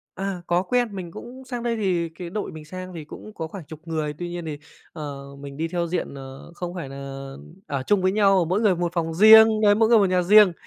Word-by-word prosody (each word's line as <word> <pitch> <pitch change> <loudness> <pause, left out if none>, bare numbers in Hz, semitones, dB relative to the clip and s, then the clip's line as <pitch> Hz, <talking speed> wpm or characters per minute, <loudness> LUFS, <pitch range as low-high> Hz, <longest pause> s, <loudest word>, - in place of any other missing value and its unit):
À, 190 -2 -4
có 175 +1 +2
quen. 245 +5 +1
Mình 175 -3 -6
cũng 255 +7 -10
sang 245 -2 -5
đây 235 -1 -1
thì 180 -5 0
cái 170 +1 -9
đội 210 +3 -4
mình 155 -1 -10
sang 185 +3 -8
thì 160 - -7
cũng 215 +7 -11
có 165 - -4
khoảng 170 0 -9
chục 155 +1 -11
người, 155 -2 -2
tuy 175 - -4
nhiên 175 0 -6
thì, 150 -2 -5 0.3
ờ, 145 -3 -7 0.2
mình 140 -1 -9
đi 165 +2 -2
theo 175 0 -1
diện, 170 -4 -3
ờ, 135 +3 -10
không 175 0 -5
phải 170 -6 -5
nà 135 - -9 0.7
ở 140 -2 -3
chung 205 -2 +2
với 185 0 +2
nhau, 195 -3 +4
mỗi 185 +6 0
người 205 -5 +3
một 175 -1 -2
phòng 165 -2 -2
riêng, 220 +3 +8
đấy, 205 -1 +5
mỗi 220 +1 +3
người 235 - +6
một 200 - +4
nhà 180 -1 +2
riêng. 205 0 +7
180 Hz, 255 wpm, -24 LUFS, 160-205 Hz, 0.7 s, riêng